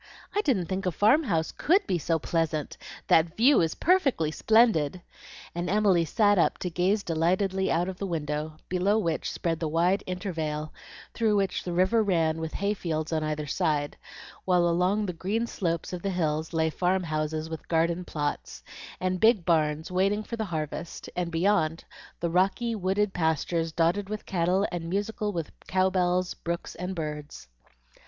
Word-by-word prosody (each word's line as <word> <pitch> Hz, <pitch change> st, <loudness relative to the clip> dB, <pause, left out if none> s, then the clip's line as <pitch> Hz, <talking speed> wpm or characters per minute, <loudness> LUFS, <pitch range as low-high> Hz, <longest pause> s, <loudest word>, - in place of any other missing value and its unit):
I 415 Hz, -, +2 dB
didn't 240 Hz, -, +1 dB
think 190 Hz, +2 st, -3 dB
a -, -, +2 dB
farm 215 Hz, -, +4 dB
house 165 Hz, -7 st, 0 dB
COULD 380 Hz, +6 st, +2 dB
be 180 Hz, -, 0 dB
so 165 Hz, +2 st, 0 dB
pleasant. 160 Hz, -1 st, -1 dB, 0.3 s
That 165 Hz, +1 st, +3 dB
view 255 Hz, +3 st, +5 dB
is 160 Hz, -1 st, 0 dB
perfectly 275 Hz, -, +2 dB
splendid!" 185 Hz, -6 st, +3 dB, 0.5 s
and 175 Hz, +1 st, -3 dB
Emily 195 Hz, -4 st, +3 dB
sat 205 Hz, +4 st, +3 dB
up -, -, +2 dB
to 180 Hz, -, -2 dB
gaze 190 Hz, +5 st, +1 dB
delightedly 185 Hz, +4 st, +1 dB
out 175 Hz, +2 st, +1 dB
of 190 Hz, -1 st, -6 dB
the 200 Hz, -, -2 dB
window, 155 Hz, -2 st, -3 dB
below 185 Hz, +4 st, +1 dB
which 165 Hz, -7 st, -1 dB
spread 165 Hz, -2 st, -2 dB
the 165 Hz, -, -1 dB
wide 175 Hz, +5 st, +2 dB
intervale, 160 Hz, -5 st, -3 dB, 0.4 s
through 220 Hz, -2 st, +2 dB
which 195 Hz, -2 st, 0 dB
the 180 Hz, -, -4 dB
river 185 Hz, +6 st, +3 dB
ran 165 Hz, -6 st, +1 dB
with 160 Hz, -1 st, -4 dB
hay 200 Hz, +2 st, 0 dB
fields 160 Hz, -5 st, -3 dB
on 155 Hz, -1 st, 0 dB
either 155 Hz, 0 st, -2 dB
side, 150 Hz, -2 st, -1 dB, 0.5 s
while 180 Hz, -2 st, +3 dB
along 180 Hz, +5 st, +1 dB
the 180 Hz, -, -3 dB
green 205 Hz, +7 st, -1 dB
slopes 170 Hz, -6 st, -3 dB
of 180 Hz, -, -4 dB
the 195 Hz, -, -2 dB
hills 160 Hz, -4 st, -1 dB
lay 160 Hz, -1 st, +1 dB
farm 185 Hz, +3 st, +1 dB
houses 155 Hz, -1 st, -2 dB
with 160 Hz, -1 st, -7 dB
garden 170 Hz, +2 st, +1 dB
plots, 145 Hz, -, -4 dB, 0.4 s
and 185 Hz, 0 st, -1 dB
big 220 Hz, -5 st, +4 dB
barns 155 Hz, -1 st, +1 dB
waiting 195 Hz, +3 st, +1 dB
for 230 Hz, -, -5 dB
the 220 Hz, -1 st, -2 dB
harvest; 160 Hz, -1 st, -5 dB
and 180 Hz, -1 st, -1 dB
beyond, 165 Hz, -2 st, +1 dB, 0.4 s
the 170 Hz, -, -1 dB
rocky, 195 Hz, +7 st, +1 dB
wooded 195 Hz, 0 st, 0 dB
pastures 165 Hz, 0 st, 0 dB
dotted 175 Hz, +5 st, +1 dB
with 215 Hz, 0 st, -5 dB
cattle 185 Hz, +2 st, +1 dB
and 170 Hz, -2 st, -4 dB
musical 205 Hz, +2 st, -2 dB
with 165 Hz, -5 st, -4 dB, 0.2 s
cow 185 Hz, 0 st, +2 dB
bells, 180 Hz, 0 st, +1 dB
brooks, 170 Hz, 0 st, -5 dB
and 180 Hz, +2 st, -5 dB
birds. 150 Hz, -, -6 dB
175 Hz, 175 wpm, -27 LUFS, 160-195 Hz, 0.5 s, view